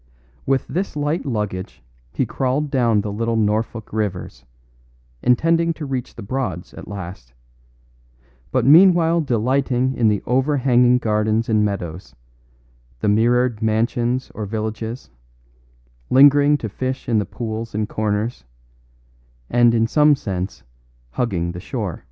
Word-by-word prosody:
With 135 0 +1
this 190 0 -3
light 150 +2 -2
luggage 95 - -4 0.3
he - - -1
crawled 135 +3 -1
down 115 -6 +2
the 105 0 -4
little 115 +2 -1
Norfolk 110 +1 -1
rivers, 90 - -4 0.8
intending 165 +7 +2
to 155 - -6
reach 130 -3 -4
the - - -8
Broads 100 -6 -4
at - - -10
last, 90 -11 -8 1.2
but - - +1
meanwhile 170 +2 +6
delighting 130 0 0
in 120 -4 +1
the 105 -2 +1
overhanging 125 -2 +3
gardens 110 0 0
and 110 -1 +3
meadows, 95 -4 -4 0.9
the - - +1
mirrored 120 +2 +2
mansions 120 +3 0
or 110 - -5
villages, 110 - -5 1.0
lingering 145 +2 +6
to 115 - -5
fish 130 +5 -4
in 115 -3 +2
the 105 - -1
pools 115 +1 -6
and 105 0 -1
corners, 105 - -2 1.1
and 120 -1 +4
in 115 0 +3
some 150 +5 +4
sense 95 -5 -5 0.5
hugging 85 - -1
the 90 - -7
shore. - - -4
115 Hz, 130 wpm, -21 LUFS, 105-130 Hz, 1.2 s, meanwhile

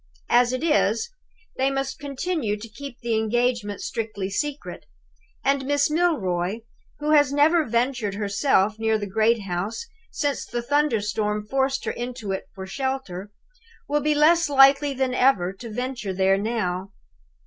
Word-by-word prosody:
As 245 0 +5
it 255 +2 -3
is, 295 - +1 0.5
they 265 +1 +2
must 270 +1 -3
continue 285 - -2
to 220 +2 -9
keep 250 +3 -9
the 235 -2 0
engagement 220 -1 0
strictly 215 -4 -4
secret; 295 +6 -4 0.6
and 275 0 +2
Miss 285 +1 +2
Milroy, 220 - 0 0.4
who 300 +1 -1
has 290 -3 +5
never 305 +3 +4
ventured 235 -3 0
herself 205 0 +1
near 220 0 +2
the 210 - -4
great 220 +2 +1
house 195 - -3 0.2
since 285 -2 -2
the 240 0 -4
thunder 285 -4 +1
storm 210 0 -2
forced 270 +3 0
her - - -1
into 240 -4 -5
it 190 - -4
for 190 -1 -6
shelter, 210 -4 -4 0.6
will 295 0 +1
be 300 0 +1
less 325 +2 +4
likely 275 0 +5
than 260 -1 0
ever 225 -9 +3
to 230 +4 -9
venture 240 -3 -4
there 190 +1 +3
now. 200 -3 -2
240 Hz, 150 wpm, -24 LUFS, 210-280 Hz, 0.6 s, As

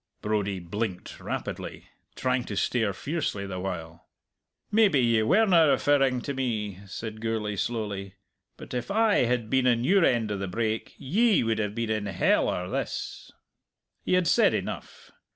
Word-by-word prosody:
Brodie 100 -2 -1
blinked 90 +2 -5
rapidly, - - -5 0.3
trying 130 -1 0
to 100 - -5
stare 110 -2 +1
fiercely 135 - -3
the 95 -1 -5
while. 85 -3 -6 0.6
"Maybe 205 -9 +4
ye 115 -3 +3
werena 175 - +5
referring 135 -3 +3
to 140 - -4
me," 110 -7 -2
said 110 +2 -7
Gourlay 110 -2 -2
slowly. 100 -3 -3 0.4
"But - - -10
if 125 +6 -3
I 215 - +3
had 120 -2 0
been 130 +2 +2
in 120 -1 +3
your 190 +7 +4
end 115 -6 +2
o' 100 - -2
the 100 - -3
brake 110 +3 -2
ye 210 - +2
would 115 -1 0
have 105 -1 -2
been 115 -1 -2
in 105 -2 -1
hell 95 -2 +2
or 90 0 -2
this!" - - -4 0.7
He - - -1
had 180 -1 +3
said - - +4
enough. - - -6
115 Hz, 160 wpm, -27 LUFS, 100-135 Hz, 0.7 s, werena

